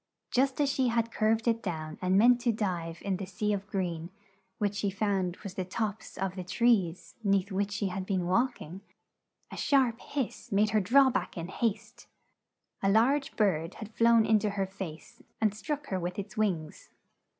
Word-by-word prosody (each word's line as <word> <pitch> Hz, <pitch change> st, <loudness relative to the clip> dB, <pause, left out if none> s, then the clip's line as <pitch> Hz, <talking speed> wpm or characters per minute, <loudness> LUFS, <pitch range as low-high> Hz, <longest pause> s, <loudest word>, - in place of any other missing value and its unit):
Just 265 Hz, +2 st, +2 dB
as 290 Hz, -, +3 dB
she 265 Hz, -1 st, +1 dB
had 230 Hz, -1 st, 0 dB
curved 225 Hz, +1 st, +1 dB
it 230 Hz, -1 st, +2 dB
down 155 Hz, -5 st, -5 dB
and 185 Hz, +1 st, +2 dB
meant 240 Hz, +3 st, +6 dB
to 235 Hz, -1 st, +2 dB
dive 175 Hz, -6 st, -2 dB
in 195 Hz, -2 st, -1 dB
the 195 Hz, -1 st, -6 dB
sea 210 Hz, +3 st, -1 dB
of 200 Hz, 0 st, -3 dB
green, 175 Hz, -5 st, -3 dB, 0.5 s
which 205 Hz, -1 st, 0 dB
she 205 Hz, 0 st, -1 dB
found 195 Hz, -3 st, -1 dB
was 200 Hz, -3 st, -6 dB
the 185 Hz, -, -2 dB
tops 210 Hz, +3 st, -4 dB
of 190 Hz, -1 st, -2 dB
the 185 Hz, -, -4 dB
trees 185 Hz, -3 st, +1 dB
'neath 200 Hz, -1 st, +1 dB
which 200 Hz, +1 st, 0 dB
she 200 Hz, -1 st, -1 dB
had 185 Hz, +1 st, -3 dB
been 185 Hz, -2 st, -1 dB
walk 235 Hz, +9 st, +1 dB
ing, 175 Hz, +5 st, -9 dB, 0.7 s
a -, -, -7 dB
sharp 260 Hz, -5 st, +2 dB
hiss 275 Hz, -5 st, -4 dB
made 210 Hz, +2 st, +3 dB
her 215 Hz, 0 st, +3 dB
draw 260 Hz, +7 st, +5 dB
back -, -, -3 dB
in 170 Hz, +1 st, -5 dB
haste. 225 Hz, +1 st, -3 dB, 0.7 s
A 195 Hz, -, +2 dB
large 265 Hz, +7 st, +3 dB
bird 175 Hz, -5 st, +1 dB
had 215 Hz, 0 st, -9 dB
flown 230 Hz, -1 st, +5 dB
in 215 Hz, -1 st, +4 dB
to 210 Hz, -, 0 dB
her 200 Hz, -1 st, -1 dB
face, 190 Hz, -5 st, -8 dB, 0.2 s
and 215 Hz, -2 st, +2 dB
struck 295 Hz, +7 st, -4 dB
her 190 Hz, -, -1 dB
with 180 Hz, +1 st, -4 dB
its 200 Hz, +2 st, -6 dB
wings. 180 Hz, -8 st, -2 dB
200 Hz, 195 wpm, -30 LUFS, 185-230 Hz, 0.7 s, meant